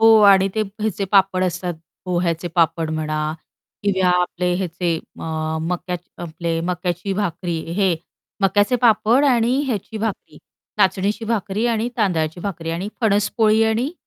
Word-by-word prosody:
हो 225 0 +7
आणि 195 0 +6
ते 220 - 0 0.2
ह्याचे 210 -2 -1
पापड 190 -2 +4
असतात. 180 0 -2 0.3
पोह्याचे 175 -1 -1
पापड 165 -1 +2
म्हणा 155 -1 -2 0.5
किंवा 190 -2 +2
आपले 180 0 -1
हेचे 175 -2 -1
अ, 160 0 -4
मक्याचे 175 +1 -4
आपले 165 0 -3
मक्याची 180 +2 -2
भाकरी 175 -3 -2 0.2
हे 190 -3 +3 0.5
मक्याचे 205 +5 +3
पापड 235 +3 +4
आणि 245 -2 +3
ह्याची 220 -2 -3
भाकरी 215 -2 -4 0.4
नाचणीची 205 +2 +1
भाकरी 215 0 -1
आणि 230 0 0
तांदळाची 175 -6 0
भाकरी 170 -4 -4
आणि 175 +5 -3
फणस 205 -3 +2
पोळी 220 -1 +4
आणि 230 +7 0
190 Hz, 135 wpm, -21 LUFS, 170-215 Hz, 0.5 s, हो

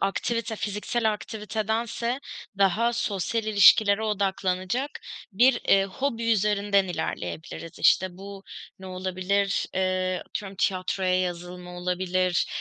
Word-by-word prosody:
aktivite, 220 +3 -1
fiziksel 215 +2 -1
aktivitedense 220 +4 -3 0.4
daha 210 +5 +3
sosyal 225 -1 -1
ilişkilere 210 0 +6
odaklanacak 200 +4 -1 0.4
bir, 245 +6 +4
eee, 195 0 +5
hobi 230 +3 -1
üzerinden 205 -1 +2
ilerleyebiliriz. 165 -1 -5
İşte, 185 - +4
bu 195 0 -9 0.4
ne 190 - -10
olabilir? 185 +2 -1
Eee, 185 -1 0
atıyorum 195 -2 -6
tiyatroya 185 0 +1
yazılma 180 0 -5
olabilir, 180 0 0
195 Hz, 100 wpm, -26 LUFS, 185-220 Hz, 0.4 s, ilişkilere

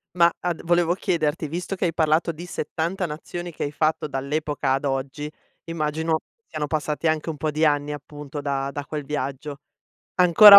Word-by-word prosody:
Ma 170 -1 +6
ad 175 -2 -1
volevo 175 0 +4
chiederti, 155 -4 +1
visto 175 +5 -3
che 185 - 0
hai 165 - +1
parlato 160 +1 +3
di 165 +2 -8
70 175 +3 -1
nazioni 175 +2 -5
che 155 - -4
hai 145 - -1
fatto 155 +1 +1
dall'epoca 145 0 0
ad 135 +2 0
oggi, 140 +2 -1 0.4
immagino 160 0 0 0.3
siano 150 - -1
passati 155 +1 0
anche 155 +1 +1
un 155 - -3
po' 155 +2 0
di 155 +2 +3
anni 145 -1 +3
appunto 145 0 -6
da 140 -1 -1
da 145 0 -4
quel 150 0 -3
viaggio. 140 0 -3 0.6
Ancora 195 +3 +11
155 Hz, 175 wpm, -25 LUFS, 145-165 Hz, 0.6 s, Ancora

